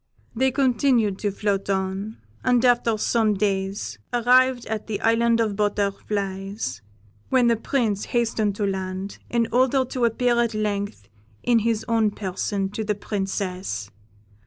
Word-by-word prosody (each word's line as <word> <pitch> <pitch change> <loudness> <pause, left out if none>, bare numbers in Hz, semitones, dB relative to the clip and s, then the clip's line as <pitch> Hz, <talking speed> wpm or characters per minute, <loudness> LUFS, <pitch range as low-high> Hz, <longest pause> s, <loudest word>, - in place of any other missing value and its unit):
They 260 +3 +3
continued 250 -6 +2
to 205 - 0
float 200 0 -1
on, 195 +2 -2 0.3
and 250 -1 +3
after 240 -2 +3
some 215 -1 +2
days 195 - -2
arrived 250 +1 +4
at 220 -1 -4
the 215 -2 -2
Island 230 +1 +3
of 215 -3 +1
Butterflies, 200 - -2 0.5
when 255 -2 +4
the 235 -1 +4
Prince 220 -3 -1
hastened 225 -4 0
to 205 - -1
land, 190 0 -4
in 235 -1 +1
order 260 +2 +3
to 250 -1 -1
appear 240 +1 +2
at 230 -2 -1
length 205 - -2 0.4
in 240 -2 +4
his 225 0 0
own 225 -2 +3
person 195 0 -2
to 220 +2 -4
the 210 0 -1
Princess. 190 - -3
215 Hz, 140 wpm, -24 LUFS, 195-235 Hz, 0.5 s, arrived